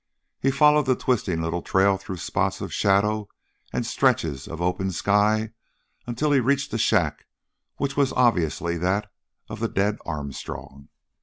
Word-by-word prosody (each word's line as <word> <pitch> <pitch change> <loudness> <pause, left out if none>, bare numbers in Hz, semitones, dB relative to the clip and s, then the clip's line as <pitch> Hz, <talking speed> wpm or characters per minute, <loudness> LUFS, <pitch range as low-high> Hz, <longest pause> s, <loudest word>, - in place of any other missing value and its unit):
He 135 - +3
followed 150 +1 +4
the 130 - +4
twisting 100 -11 0
little 85 +1 -2
trail 95 +2 +3
through 95 -1 -7
spots - - -1
of - - -6
shadow 105 +1 +2 0.4
and - - -2
stretches 70 -4 0
of 80 - -7
open 90 +2 0
sky 105 +4 +2 0.6
until 125 +5 0
he 140 - +5
reached 140 +3 +1
the 115 - -2
shack 90 -9 +1 0.5
which 140 0 -2
was 140 -2 +2
obviously 85 -7 +1
that 100 +4 -1 0.4
of 110 -1 -7
the 115 0 -1
dead 100 +2 0
Armstrong. 70 -2 -7
100 Hz, 150 wpm, -24 LUFS, 85-125 Hz, 0.6 s, he